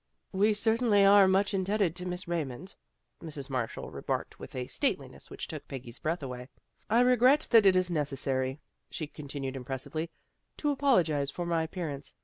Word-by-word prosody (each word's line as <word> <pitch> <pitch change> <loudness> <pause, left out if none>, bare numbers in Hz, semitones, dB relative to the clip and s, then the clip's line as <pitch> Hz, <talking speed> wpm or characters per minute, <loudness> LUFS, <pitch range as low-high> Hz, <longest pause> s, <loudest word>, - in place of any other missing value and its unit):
" - - -49
" - - -48
We 215 0 +4
certainly 220 -2 +3
are 200 -1 +7
much 195 +2 +2
indebted 195 -2 +1
to 180 0 -5
Miss 180 0 -4
Raymond," 165 +1 -4 0.5
Mrs. 145 -4 -7
Marshall 125 -4 -3
remarked - - -4
with - - -10
a 125 -1 -2
stateliness - - -2
which - - -6
took - - -8
Peggy's 125 -3 -8
breath 165 0 -2
away. 125 -1 -6 0.2
" - - -41
I 230 +3 +4
regret 250 +4 +5
that 225 -4 +7
it 190 - +6
is 185 -1 +2
necessary," 135 -3 -1 0.3
she 155 - -4
continued 140 -2 -6
impressively, 135 +5 -4 0.2
" - - -49
to 295 - 0
apologize 175 - +2
for 175 +5 -4
my 170 -1 +1
appear 165 +1 -4
ance. 140 0 -9
170 Hz, 185 wpm, -30 LUFS, 140-200 Hz, 0.5 s, are